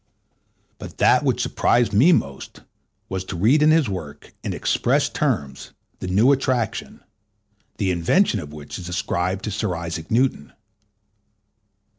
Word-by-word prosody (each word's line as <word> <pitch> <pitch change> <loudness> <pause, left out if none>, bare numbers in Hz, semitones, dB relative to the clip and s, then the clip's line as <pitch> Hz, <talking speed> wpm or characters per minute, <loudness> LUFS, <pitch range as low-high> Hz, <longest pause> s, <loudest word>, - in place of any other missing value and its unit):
But - - -10
that - - +4
which - - 0
surprised 120 -4 +1
me 130 - +5
most 70 - -2 0.5
was 95 -1 -4
to 95 - -6
read 115 - +3
in 150 - +5
his 155 -2 +4
work, 85 -8 -7
in - - -3
express - - +1
terms, 70 -2 -3 0.3
the - - -5
new 105 +9 +4
attraction, 130 -5 -1 0.7
the 95 -3 0
invention 105 - +2
of 75 -5 -8
which 75 +2 -8
is 90 -1 -8
ascribed 90 +1 -2
to 105 - -3
Sir 100 -2 -2
Isaac 85 -1 -6
Newton. 120 - 0
95 Hz, 140 wpm, -22 LUFS, 85-120 Hz, 0.7 s, me